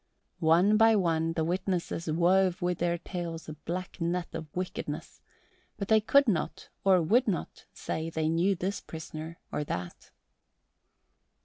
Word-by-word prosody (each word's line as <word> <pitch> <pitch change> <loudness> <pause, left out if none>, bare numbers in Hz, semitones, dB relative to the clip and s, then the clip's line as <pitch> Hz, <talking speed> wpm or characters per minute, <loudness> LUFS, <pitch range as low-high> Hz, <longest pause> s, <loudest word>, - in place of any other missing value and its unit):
One 175 +6 +5
by 225 0 +6
one 165 -4 +1
the 160 - 0
witnesses 175 -1 -2
wove 180 +2 +3
with 175 -1 -1
their 170 0 +1
tales 170 -2 -5
a 155 - -5
black 180 +4 -6
net 170 +1 -1
of 160 -1 -5
wickedness, 180 0 -5 0.6
but 200 - -4
they 220 -1 +5
could 280 +5 +4
not 180 -8 -1
or 185 -3 +5
would 235 +10 +3
not 190 -5 -3
say 160 +1 -4
they 160 -1 -1
knew 170 +5 +2
this 190 +3 -3
prisoner 160 0 -8
or 150 - -1
that. 90 -9 -5
175 Hz, 145 wpm, -29 LUFS, 165-190 Hz, 0.6 s, by